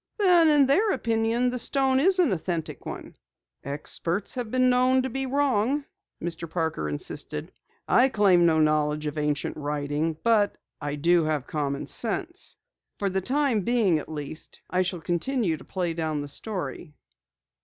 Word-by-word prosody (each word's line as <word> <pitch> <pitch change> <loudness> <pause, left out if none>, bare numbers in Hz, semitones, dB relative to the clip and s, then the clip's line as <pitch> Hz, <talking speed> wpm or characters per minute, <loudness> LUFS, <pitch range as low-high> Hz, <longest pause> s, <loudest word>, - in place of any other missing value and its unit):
"Then, 355 -6 +5
in 295 -2 +5
their 355 +12 +3
opinion 230 +2 +1
the 250 - -3
stone 265 +1 +2
is 370 +6 +4
an 345 - +3
authentic 170 -2 -3
one?" - - -7 0.5
"Experts 165 +6 -3
have 245 -3 -4
been 255 +2 +2
known 255 +1 +3
to 260 - -3
be 270 +1 -2
wrong," 275 0 +1 0.3
Mr. 170 0 -4
Parker 160 - -2
insisted. 75 0 -3 0.4
"I 260 +2 +5
claim 200 -6 +4
no 160 -1 +3
knowledge 150 0 +1
of 150 0 -3
ancient 150 -1 -1
writing, 150 +2 -2
but 220 -3 +3 0.2
I 145 0 -3
do 170 +2 +3
have 150 -4 -1
common 140 -2 -2
sense. 340 - -1 0.4
For 200 -1 -1
the 190 +1 0
time 260 0 +1
being, 205 -6 +2
at 150 - -9
least, 155 0 -6
I 185 - +2
shall 180 -2 -2
continue 180 +2 0
to - - -12
play 180 -3 -2
down 160 -2 -2
the 145 - -5
story." 175 -1 -5
185 Hz, 160 wpm, -26 LUFS, 155-255 Hz, 0.5 s, Then